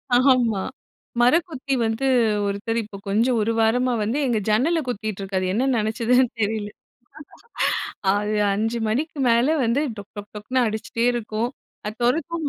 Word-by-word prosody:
ஆமா, 245 -6 +3 0.6
மரக்குத்தி 275 0 +2
வந்து 225 +4 -1 0.4
ஒருத்தர் 225 +4 -2
இப்ப 205 -1 -10
கொஞ்சம் 230 +5 +2
1 225 +2 +1
வாரமா 245 +3 +2
வந்து 230 +7 -1
எங்க 230 -3 +1
ஜன்னல 310 +10 +2
குத்திட்டு 215 -4 -3
இருக்காரு! 190 -1 -2
என்ன 255 +5 +1
நெனைச்சுதுன்னு 230 +3 +2
தெரியல. 210 0 -1 1.5
அது 210 +1 -1 0.2
5 225 +3 -1
மணிக்கு 290 +7 -2
மேல 235 +5 +4
வந்து 235 +5 +2 0.2
டொக் 205 0 -10
டொக் 205 +1 -9
டொக்குன்னு 250 +5 0
அடிச்சிட்டே 225 +2 -2
இருக்கும். 230 +1 -2 0.4
அத 210 - -4
தொறத்தவும் 315 +4 0
230 Hz, 135 wpm, -23 LUFS, 215-255 Hz, 1.5 s, மேல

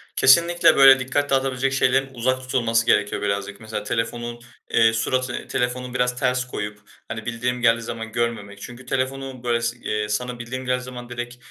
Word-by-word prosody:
Kesinlikle 170 +6 +5
böyle 135 -1 +8
dikkat 145 +3 -1
dağıtabilecek 135 0 +1
şeylerin 135 0 +2
uzak 130 +1 0
tutulması 115 -3 +1
gerekiyor 105 -2 +2
birazcık. 100 0 -2
Mesela 110 -1 -5
telefonun, 120 +2 -3 0.3
eee, 115 -1 +4
suratı 130 +3 -1
eee, - - -6
telefonu 125 0 -2
biraz 125 0 0
ters 125 -2 0
koyup, 105 -4 -5 0.3
hani, 110 -1 -6
bildirim 120 +1 -2
geldiği 115 -1 +4
zaman 115 -1 -6
görmemek 105 -4 -3
çünkü 125 +1 -10
telefonu 130 0 -3
böyle 120 -1 +1
s 115 +1 -2
eee, 105 -2 -3
sana 125 +3 -3
bildirim 130 +2 -6
geldiği 125 0 0
zaman 125 -1 -9
direkt 120 0 -6
125 Hz, 170 wpm, -23 LUFS, 115-130 Hz, 0.3 s, böyle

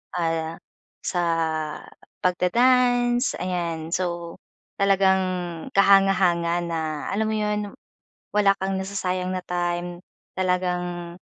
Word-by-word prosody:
ah, 165 -1 -1 0.4
sa 175 - -1 1.0
pag-da-dance, 245 +6 +3
ayan. 170 -3 -3
So, 170 -2 -3 0.4
talagang 195 -1 +4 0.5
kahanga-hanga 185 -4 +4
na 165 -1 -2 0.3
alam 215 +2 0
mo 220 - -1
'yon, 210 0 0 0.7
wala 205 -1 +4
kang 190 0 -1
nasasayang 185 -1 -2
na 185 - -2
time. 175 0 -2 0.4
Talagang, 180 -2 -1
180 Hz, 90 wpm, -24 LUFS, 175-195 Hz, 1.0 s, talagang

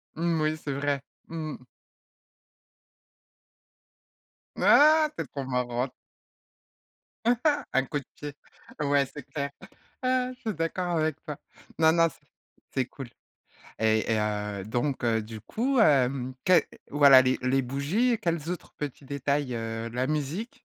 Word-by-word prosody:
Mmh, 165 -1 0
oui, 155 +1 +1
c'est 145 -2 -4
vrai. 140 0 -1 0.3
Mmh. 155 -5 -6 2.9
Ah! 310 +1 +6
Tu - - -2
es - - -14
trop 140 -2 -4
marrante! 125 0 -1 1.8
Un 135 0 +3
coup 145 0 -2
de 135 - -14
pied, 145 -1 -7 0.5
ouais 140 -1 +3
c'est 145 +1 -10
clair. 140 +1 -4 0.5
Ah 255 0 +1
je 255 - -28
suis 220 -5 -3
d'accord 170 +2 -1
avec 155 -1 0
toi. 150 -3 -5 0.4
Non 160 0 +6
non, 165 0 +4
c'est - - -22 0.5
c'est 130 - +1
cool, 135 -1 -9 0.7
et 110 0 +2
heu, 105 -2 -1
donc 125 +4 -1
heu, 115 -2 +2
du 110 0 -8
coup, 255 - -1
heu, 130 - +3
quel, 180 -4 +6 0.3
voilà 140 -2 +8
les 130 0 +1
les 135 +1 +2
bougies, 155 - +1
quels 170 -2 -1
autres 180 - -6
petits 145 -1 -6
détails, 140 -1 -1
heu, 115 0 -4
la 125 +3 -1
musique? 155 - -3
140 Hz, 135 wpm, -27 LUFS, 125-165 Hz, 2.9 s, voilà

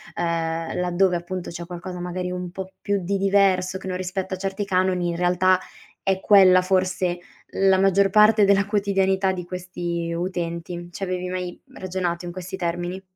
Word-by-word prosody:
ehm, 165 -1 -2
laddove 180 +1 +2
appunto 175 +1 -4
c'è 170 0 -7
qualcosa 180 +1 -7
magari 180 +1 -3
un 180 -1 -5
po' 190 0 -7
più 200 -1 0
di 195 +3 -1
diverso 195 -1 +2
che 190 - -9
non 185 - -2
rispetta 185 +1 -3
certi 195 +2 -3
canoni, 185 -2 +1
in 170 - -2
realtà 180 +1 +3 0.5
è 190 -1 +1
quella 185 -3 +6
forse 185 -1 0 0.3
la 190 -1 +3
maggior 195 0 +4
parte 210 +1 +5
della 200 0 +4
quotidianità 195 -2 +1
di 180 -2 -5
questi 175 -2 -4
utenti. 175 0 -4
C'avevi 180 -1 -3
mai 180 -1 -5
ragionato 180 -2 -3
in 175 - -5
questi 185 +1 -6
termini? 175 +1 -3
185 Hz, 160 wpm, -23 LUFS, 175-190 Hz, 0.5 s, quella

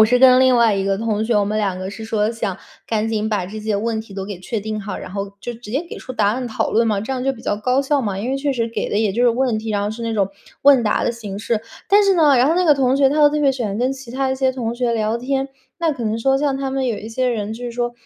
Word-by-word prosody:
我 - - +9
是 250 +3 +3
跟 255 0 +7
另 260 -1 +5
外 230 -3 +4
一 195 0 -1
个 195 0 0
同 220 -1 -1
学， 230 0 0
我 205 - +3
们 210 +2 -2
两 195 -3 -1
个 185 0 -5
是 220 +2 -8
说 220 -1 0
想 210 -5 -3 0.3
赶 220 -1 0
紧 220 -1 -1
把 200 -5 -1
这 215 +3 -7
些 215 -1 -1
问 220 +1 -1
题 220 -2 -12
都 195 -1 -4
给 200 -3 -6
确 215 +3 -4
定 215 +1 -4
好， 205 0 -5
然 - - -8
后 200 0 -4
就 240 +4 -5
直 225 -2 -11
接 285 +8 -2
给 - - -7
出 255 - -8
答 210 -4 +2
案 250 +3 -1
讨 220 - -1
论 230 +1 +3
嘛， 210 -3 +1
这 220 +6 -4
样 255 -1 -3
就 270 - +2
比 240 - -12
较 205 - -1
高 250 +5 +1
效 280 +1 +1
嘛， 200 -3 -2
因 225 +5 -3
为 270 - 0
确 280 0 -1
实 230 -2 -1
给 230 - -3
的 205 - +1
也 215 -3 +1
就 235 +5 0
是 240 - +5
问 245 -1 0
题， 220 0 -5
然 205 -1 0
后 205 - -1
是 230 +2 -7
那 230 - -2
种 195 -2 +1 0.3
问 275 -3 +6
答 215 - +1
的 - - +2
形 210 -4 -7
式。 225 0 -1 0.3
但 410 +1 +6
是 395 -1 +4
呢， 300 -6 +5
然 250 +1 +4
后 325 - +3
那 365 +1 +2
个 300 -4 +6
同 265 -1 +2
学 275 -1 +5
他 280 - -1
都 290 - +7
特 300 0 -1
别 280 -2 +4
喜 255 - -4
欢 205 0 -3
跟 255 +2 +1
其 270 -3 -10
他 265 +1 -1
一 265 - +1
些 265 0 +2
同 235 -3 -3
学 240 -1 0
聊 220 0 0
天， 270 +2 -1 0.3
那 330 -3 +1
可 255 - -6
能 220 +1 -1
说 270 +3 +2
像 280 -1 0
他 270 -1 -2
们 265 0 -1
有 230 -4 -1
一 220 - -8
些 250 +3 0
人 215 -3 -2
就 245 - -8
是 240 - -3
说， 240 0 -2
230 Hz, 355 characters per minute, -20 LUFS, 215-265 Hz, 0.3 s, 我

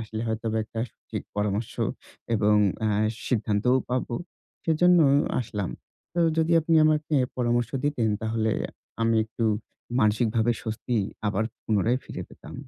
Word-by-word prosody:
আসলে 110 0 -5
হয়তো 110 +1 -2
বা 110 - +1
একটা 110 +1 -5
সঠিক - - -7
পরামর্শ 105 +2 -1 0.6
এবং 105 -1 +3 0.3
অ্যা 105 -2 +1 0.3
সিদ্ধান্তও 110 +1 +2
পাবো। 125 -1 -1 0.5
সেজন্য 175 +2 +5 0.4
আসলাম। 105 -5 -3 0.4
তো 175 - +1 0.2
যদি 160 +1 +2
আপনি 165 +1 +1
আমাকে 155 0 +2 0.2
পরামর্শ 120 -1 +1
দিতেন, 135 -6 +1
তাহলে 110 0 0 0.5
আমি 115 0 +3
একটু 115 +1 -4 0.6
মানসিকভাবে 110 +1 +2
স্বস্তি 115 +2 -2 0.3
আবার 105 +1 +1 0.2
পুনরায় 110 +4 +2
ফিরে - - -6
পেতাম। - - -12
115 Hz, 130 wpm, -26 LUFS, 110-125 Hz, 0.6 s, সেজন্য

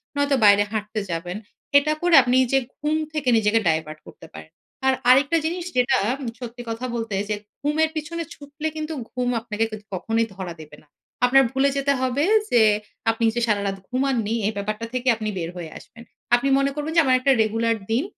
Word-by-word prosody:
নয়তো 285 -1 +2
বাইরে 205 0 +6
হাঁটতে 215 0 -3
যাবেন। 175 +3 -4 0.4
এটা 295 +2 +2
করে 350 -1 +4
আপনি 250 0 +2 0.2
যে 270 - +5 0.2
ঘুম 300 +1 -1 0.2
থেকে 295 -4 -1
নিজেকে 220 +1 +3
divert 155 -1 -1
করতে - - -13
পারেন। 80 0 -11 0.4
আর 265 - +5 0.2
আরেকটা 280 +6 +5
জিনিস 345 +1 -2
যেটা 250 +1 +3 0.4
সত্যি 245 -1 -7
কথা 230 +3 -4
বলতে 225 -3 -3
যে 210 - 0 0.3
ঘুমের 305 +2 +1
পিছনে 335 +2 -4
ছুটলে 295 +2 -6
কিন্তু 310 +1 -4 0.2
ঘুম 250 -1 -1
আপনাকে 225 -1 -2
কিন্তু 215 -1 -9
কখনোই 225 +5 0
ধরা 185 -3 -6
দেবে 150 - -13
না। - - -29 0.4
আপনার 270 +2 +5
ভুলে 270 +1 +2
যেতে 280 0 +2
হবে 260 +3 0 0.3
যে 240 -2 +5 0.5
আপনি 225 +1 -1
যে 240 - 0
সারারাত 200 -2 0
ঘুমাননি 250 -4 0
এই - - 0
ব্যাপারটা 215 +3 -3
থেকে 255 0 -3
আপনি 215 -1 -4
বের 165 -1 -3
হয়ে 165 -3 -7
আসবেন। 230 0 -14 0.3
আপনি 260 +3 0
মনে 275 0 +1
করবেন 300 +1 -3
যে, 330 - +7
"আমার 260 -1 +4
একটা 270 +2 +2
regular 225 +1 0 0.2
দিন 245 +6 +2
245 Hz, 190 wpm, -23 LUFS, 215-280 Hz, 0.5 s, যে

